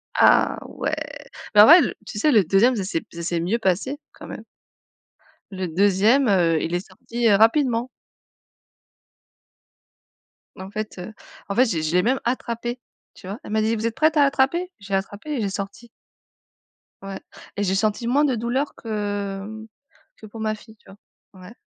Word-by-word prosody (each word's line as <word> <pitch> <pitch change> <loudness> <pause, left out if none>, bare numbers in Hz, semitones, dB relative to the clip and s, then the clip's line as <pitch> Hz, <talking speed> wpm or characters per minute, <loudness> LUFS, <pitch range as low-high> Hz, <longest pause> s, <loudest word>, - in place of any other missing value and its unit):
Ah - - +4
ouais. - - -4 0.6
Ben 210 - +9
en - - +9
vrai 330 +8 +9
l 285 - 0
tu 210 - -8
sais 300 +7 +3
le 215 -5 +5
2e, 200 +9 +3
ça 200 - -2
s'est 185 -4 -2
b - - -22
ça 170 - -7
s'est 170 0 -1
mieux 190 +8 -1
passé 220 - -1
quand - - -12
même - - -8 1.1
le 185 -2 -4
2e, 205 - +3
heu, 170 -6 +3
il 170 +2 -2
est 180 +3 -3
sorti, 230 +5 -2
heu, 200 - +6
rapidement 235 +2 +3 2.7
en 190 0 -9
fait, 215 -1 -5
heu, 200 +5 -8 0.4
en 200 - -2
fait, 255 - +5
je 220 -9 -1
l'ai 155 - -2
je 155 +1 -2
l'ai 180 - +4
même 255 +3 +1
attrapé, 240 0 -3 0.3
tu - - -13
vois? 200 +5 -6
Elle - - -9
m'a 220 0 +1
dit: 220 +1 +1
«Vous 225 +1 -1
êtes 230 - -4
prête 310 0 +2
à 290 - +6
attraper?» 280 +6 +1
J'ai 200 0 -8
attrapé 200 +8 -5
et 270 - -1
j'ai 200 - -1
sorti. 200 +4 -7 1.1
Ouais 195 0 -6 0.4
et 205 - 0
j'ai 190 0 0
senti 215 +4 0
moins 285 +5 +3
de 265 -4 +1
douleur 245 +5 -2
que 205 0 -5 0.5
que - - -13
pour 215 +1 -11
ma 215 0 -1
fille, 220 +1 -16
tu - - -22
vois? 195 - -14 0.5
Ouais. 190 +5 -12
215 Hz, 190 wpm, -23 LUFS, 195-240 Hz, 2.7 s, Ben